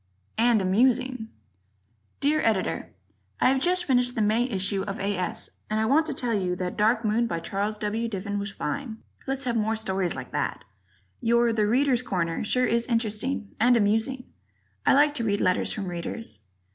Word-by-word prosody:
" 100 - -41
And 220 -5 +3
Amusing" 245 +4 +1 0.9
Dear 300 +2 +3
Editor: 215 -4 0 0.5
I - - +4
have 265 0 +1
just 360 +2 +1
finished 245 -3 +2
the 225 - 0
May 220 +3 +2
issue 195 -2 0
of 195 0 -5
A. 200 +1 -1
S. 180 -1 -3 0.2
and 215 0 0
I 220 - +1
want 305 +7 +3
to 305 - -2
tell 245 -3 -1
you 185 -4 0
that 180 0 -4
"Dark 220 +2 +2
Moon," 225 +3 +2
by 170 -7 -2
Charles 205 +5 -2
W. 215 +2 -2
Diffin, 205 0 -3
was 200 +1 -3
fine. 235 +2 -4 0.3
Let's 270 0 -1
have 245 -3 -1
more 220 0 +1
stories 190 -4 -1
like - - -7
that. - - -2 0.6
Your 235 0 +3
"The 215 -2 +1
Readers' 250 +2 +2
Corner" 170 -8 -2
sure 250 +4 +2
is 235 0 0
interesting 230 0 -1
and 245 +1 +5
amusing. 225 +5 +2 0.6
I - - +6
like 290 +1 +5
to 255 -5 -2
read 205 -2 0
letters 185 0 +1
from 205 - -4
Readers. 175 - -5
225 Hz, 185 wpm, -26 LUFS, 200-250 Hz, 0.9 s, I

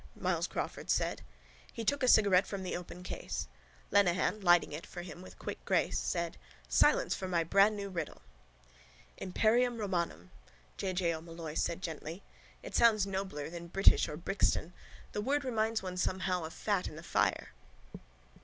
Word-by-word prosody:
Myles - - 0
Crawford - - -4
said. - - +1 0.5
He 230 - -5
took 285 +5 +1
a 255 - +2
cigarette 200 -5 +6
from 195 -2 -4
the 185 - -3
open 180 0 -7
case. - - -4 0.4
Lenehan, 200 +1 +3
lighting 175 -4 +5
it 150 +3 -6
for 175 - -7
him 175 0 -9
with 185 - -12
quick - - -6
grace, - - +1
said: 170 -1 -2 0.3
—Silence - - +4
for 190 - -4
my 170 -2 +1
brandnew 200 +4 +3
riddle! 165 -5 -5 0.9
—Imperium 230 +6 +2
romanum, 170 - -2 0.4
J. 190 -1 -2
J. 175 -2 +1
O'Molloy 165 -1 -7
said 170 +3 -1
gently. 165 +2 -6 0.4
It - - -8
sounds 215 -4 +5
nobler 190 -7 -3
than 170 0 -7
British 195 +3 +4
or 150 - -5
Brixton. 180 -1 0 0.4
The 210 - -2
word 280 +5 0
reminds 225 -3 0
one 180 -1 -5
somehow 185 -1 0
of 160 - -7
fat 200 -4 0
in - - -8
the 155 - -9
fire. - - +1
185 Hz, 160 wpm, -32 LUFS, 170-205 Hz, 0.9 s, cigarette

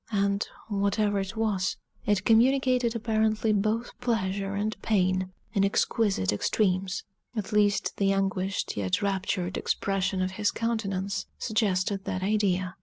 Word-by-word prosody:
And, 200 0 +1 0.2
whatever 205 0 +1
it 195 +3 -4
was, 205 -4 0 0.3
it 205 -2 +2
communicated 250 0 +3
apparently 220 -1 +1
both 215 +3 0
pleasure 200 -4 -1
and 210 +2 -1
pain 185 -3 +1 0.2
in 200 -3 +2
exquisite 195 - +1
extremes; 185 - 0 0.3
at 215 0 -3
least 205 -1 +2
the 195 -1 +2
anguished 195 0 -1
yet 95 - 0
raptured 190 -2 -1
expression 195 -1 0
of 185 - -1
his 205 +2 0
countenance 200 -4 -2
suggested 200 -3 0
that 185 - -2
idea. 190 -3 +1
200 Hz, 125 wpm, -27 LUFS, 190-215 Hz, 0.3 s, communicated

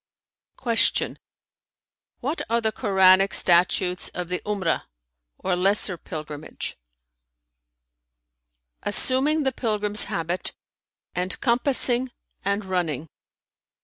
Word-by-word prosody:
Q 230 -3 0 1.0
"What 290 +7 -3
are 230 +1 +2
the 220 -1 0
Koranic 195 -3 +4
statutes 180 +1 +3
of 180 -1 -4
the 180 - -1
'Umrah[FN#323] 195 -5 -1 0.5
or 185 -1 -1
lesser 190 +1 +1
pilgrimage?" 155 -2 -7 2.1
"Assuming 270 +8 +3
the 265 - +1
pilgrim's 210 -4 +1
habit 170 +2 -4 0.6
and 180 +1 -3
compassing 250 0 +2 0.3
and 200 +1 -1
running." 165 -5 -2
195 Hz, 85 wpm, -24 LUFS, 180-235 Hz, 2.1 s, Koranic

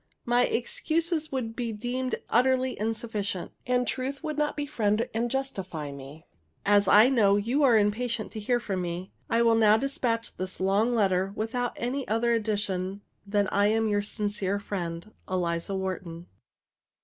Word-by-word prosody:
My 240 +1 +4
excuses 315 +6 -1
would 235 -4 -3
be 240 -2 -2
deemed 250 +4 -2
utterly 260 +1 +2
insufficient, 215 -4 -3 0.2
and 250 -1 +1
truth 270 +3 -3
would 305 -1 -3
not 300 0 -1
befriend 230 -7 0
and 235 +2 0
justify 190 - -3
me. 140 +3 -11 0.4
As 205 -1 +4
I 215 +3 +8
know 215 -7 +4
you 235 +8 +1
are 250 -5 +6
impatient 220 +2 0
to 220 - -6
hear 240 +4 +1
from 195 -5 -3
me, 175 +1 -4 0.2
I 230 +1 +3
will 230 -1 +5
now 220 -1 +5
despatch 240 -3 -2
this 185 0 -4
long 205 +6 +2
letter 190 -3 +2
without 240 +3 -2
any 255 +3 -3
other 230 +2 +2
addition 205 -3 -1 0.3
than 205 0 +2
that - - -5
I 200 +1 +4
am 220 +1 +2
your 205 -1 +1
sincere 205 -1 -2
friend, 190 -1 -5 0.2
ELIZA 175 0 -1
WHARTON. 185 -3 -4
220 Hz, 160 wpm, -27 LUFS, 195-245 Hz, 0.4 s, I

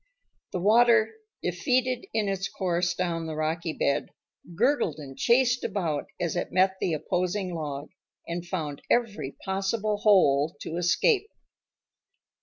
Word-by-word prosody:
The 180 - -2
water, 225 +2 +5 0.3
defeated 250 - 0
in 215 -2 0
its 195 0 -2
course 175 -2 -1
down 170 -2 -2
the 160 - -4
rocky 160 +2 -1
bed, 140 - 0 0.5
gurgled 240 - +2
and 140 -3 -9
chased 245 - +3
about 165 -8 -2
as 175 -1 -1
it 175 - -2
met 190 +1 +3
the 175 - +1
opposing 180 +4 -1
log, 145 -3 -5 0.4
and 170 0 -3
found 160 -5 -4
every 210 - 0
possible 200 +2 -1
hole 160 -8 +4
to 165 - -4
escape. 395 - +2
180 Hz, 130 wpm, -27 LUFS, 165-215 Hz, 0.5 s, water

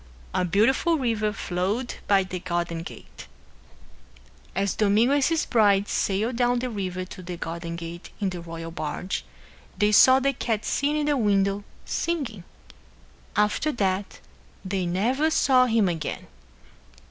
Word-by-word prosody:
A - - +1
beautiful 230 - +2
river 225 -5 0
flowed 205 +6 -2
by 195 -1 +4
the 185 -1 -5
garden 170 -1 -2
gate. - - -11 1.3
As 195 +1 0
Domingo 215 +5 +3
and 285 -1 +3
his 325 +2 +1
bride 205 -4 +3
sailed 215 +5 0
down 245 0 +2
the 250 0 -2
river 185 -3 -3
to 185 - -10
the 180 -1 -6
garden 170 0 -5
gate 170 +1 -8
in 195 -3 0
the 175 -1 -6
royal 165 0 -7
barge, 165 +3 -4 0.5
they 210 +2 +3
saw 260 +5 +7
the 275 +1 +1
cat 225 -4 -2
sitting 290 +2 0
in 300 - 0
the 295 -1 +2
window 200 -3 +1 0.2
singing. 275 - -2 0.9
After 210 +9 +2
that 195 -3 -1 0.5
they 185 -1 -1
never 245 - +1
saw 255 -5 +4
him 225 -4 +3
again. 165 -4 -3
205 Hz, 145 wpm, -25 LUFS, 180-245 Hz, 1.3 s, saw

